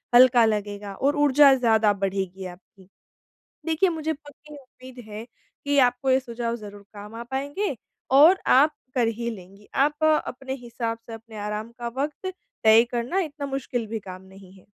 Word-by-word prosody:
हल्का 245 -1 +7
लगेगा 205 -2 -3
और 280 +8 +1
ऊर्जा 280 0 +6
ज़्यादा 220 -4 +3
बढ़ेगी 190 -1 -3
आपकी। 180 +2 -13
उ - - -23 0.8
देखिए, 325 +3 +2
मुझे 320 -1 -2
पक्की 295 0 -15
उम्मीद 255 -1 -14
है 215 +1 -7 0.4
कि 285 0 +1
आपको 250 +1 +2
ये 260 - +4
सुझाव 235 -2 -4
ज़रूर 205 -3 -10
काम 210 +1 -10
आ 230 - -6
पाएँगे 285 +6 -2 0.4
और 310 +8 +7
आप 295 +4 +5 0.2
कर 240 -3 +2
ही 235 +1 -3
लेंगी। 195 0 -13 0.2
आप 300 +1 -3
अपने 270 -4 0
हिसाब 235 -3 -4
से 230 - -9
अपने 225 0 -11
आराम 210 +2 -4
का 240 - -4
वक़्त 305 +6 -4 0.3
तय 220 +1 +7
करना। 245 +10 -1
इतना 300 -5 -4
मुश्किल 255 -4 -3
भी 220 +1 -4
काम 185 -2 -10
नहीं 190 0 -16
है। 190 - -19
240 Hz, 170 wpm, -24 LUFS, 210-280 Hz, 0.8 s, हल्का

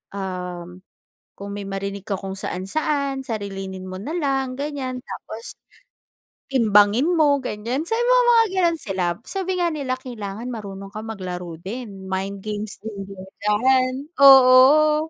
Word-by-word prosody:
um, 180 -2 -6 0.6
"Kung 200 0 -7
may 200 -1 -6
marinig 200 0 -4
ka 195 - -1
kung 190 0 -6
saan-saan 275 +9 -2
sarilinin 195 -5 -5
mo 185 0 -7
na 310 - -4
lang 270 -4 -1
ganyan 275 -3 -3
tapos, 225 +2 -8 1.0
timbangin 220 -1 +4
mo." 295 -4 +4
Ganyan. 240 +6 -3
So, 450 - -2
may 480 - +1 0.3
mga 460 -1 +6 0.2
gano'n 340 -2 +2
sila. 195 -6 -2 0.2
Sabi 375 -1 -2
nga 345 - +2
nila, 275 -4 -2
"Kailangan 230 -2 -6
marunong 195 -4 -7
kang 215 +1 -6
maglaro 180 -4 -5
din 195 -2 -7
mind 195 +1 -3
games 210 0 -5
din 205 -3 -6
diyan." 210 +7 +1 0.3
Oo. 275 +4 +7
215 Hz, 135 wpm, -22 LUFS, 195-270 Hz, 1.0 s, Oo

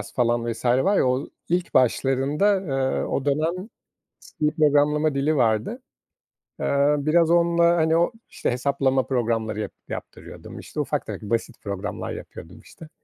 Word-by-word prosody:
falan 120 -1 +1
vs. 115 - -8
var 130 +12 +3
ya, - - +3
o 130 +3 -1 0.2
ilk 175 +1 -1
başlarında, 135 - +2
eee, 135 -6 -1
o 140 - -2
dönem 165 +8 -1 0.7
C 150 - +3
programlama 150 0 +3
dili 145 +3 +1
vardı. 120 - 0 0.8
Eee, 140 +1 +2
biraz 160 +3 +3
onunla, 170 0 +3
hani 160 -1 +2
o, 170 +6 +2 0.2
işte, - - -2
hesaplama 130 +1 +1
programları 115 -4 -1
yap 110 - -4 0.2
yaptırıyordum. - - -9
İşte, - - -8
ufak - - -1
tefek - - -6
basit 115 +1 -2
programlar 100 -2 -5
yapıyordum - - -10
işte. 160 - -14
140 Hz, 145 wpm, -24 LUFS, 125-160 Hz, 0.8 s, var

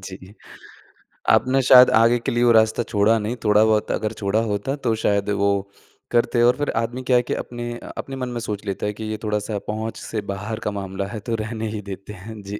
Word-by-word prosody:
जी, 95 +1 -10 1.0
आपने 135 +1 +4
शायद 125 0 +8
आगे 115 +1 +4
के - - -3
लिए 120 +1 +1
वो 120 - +5
रास्ता 110 +1 +3
छोड़ा 105 +2 +2
नहीं, 110 +3 -3
थोड़ा-बहुत 105 0 +3
अगर 110 0 -2
छोड़ा 100 +2 +1
होता। 105 +5 -2
तो 125 -6 -1
शायद 100 0 +1
वो 100 0 +2 0.6
करते 120 0 +2
और 125 +2 +4
फ़िर 145 - -1
आदमी 115 +3 -2
क्या 125 - +6
है 120 - +2
कि - - +1
अपने 120 0 -5
अ, - - -11
अपने 135 - -5
मन 125 -1 -4
में 120 -1 -4
सोच 105 0 -4
लेता 100 +1 -3
है 105 - -1
कि 110 - -8
ये 110 - -3
थोड़ा-सा 105 0 -2
पहुँच 110 +1 -4
से 110 -2 -4
बाहर 105 +3 -5
का - - 0
मामला 95 0 -4
है - - -4
तो 115 - +1
रहने 110 -1 -4
ही 105 - -4
देते 95 +2 -8
हैं। 105 +3 -10
जी। 100 +1 -7
110 Hz, 225 wpm, -22 LUFS, 105-120 Hz, 1.0 s, शायद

